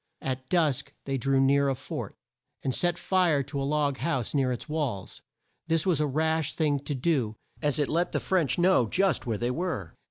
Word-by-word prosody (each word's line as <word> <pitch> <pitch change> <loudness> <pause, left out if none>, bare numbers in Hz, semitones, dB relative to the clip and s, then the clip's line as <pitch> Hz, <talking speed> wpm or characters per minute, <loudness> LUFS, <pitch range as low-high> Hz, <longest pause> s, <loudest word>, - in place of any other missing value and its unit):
At 130 -1 -4
dusk 160 -7 +1
they 135 -1 -1
drew 135 +1 +2
near 140 +1 +4
a 135 - 0
fort, - - -6 0.5
and 130 - 0
set 175 +3 +1
fire 175 -8 +2
to 140 0 -4
a 135 - -1
log 145 -2 +1
house 135 -8 -1
near 135 -3 +2
its 125 - -4
walls. 145 -11 -3 0.5
This 165 -1 +2
was 170 -6 +2
a 150 - +2
rash 160 +2 0
thing 150 -3 +1
to 145 - -2
do, 125 -6 0 0.3
as 150 -2 +1
it 145 -2 +1
let 170 +3 0
the - - 0
French 170 -9 +1
know 175 -9 +4
just 190 -7 +1
where 110 -3 0
they 120 +3 -1
were. 140 - -3
145 Hz, 200 wpm, -28 LUFS, 130-165 Hz, 0.5 s, near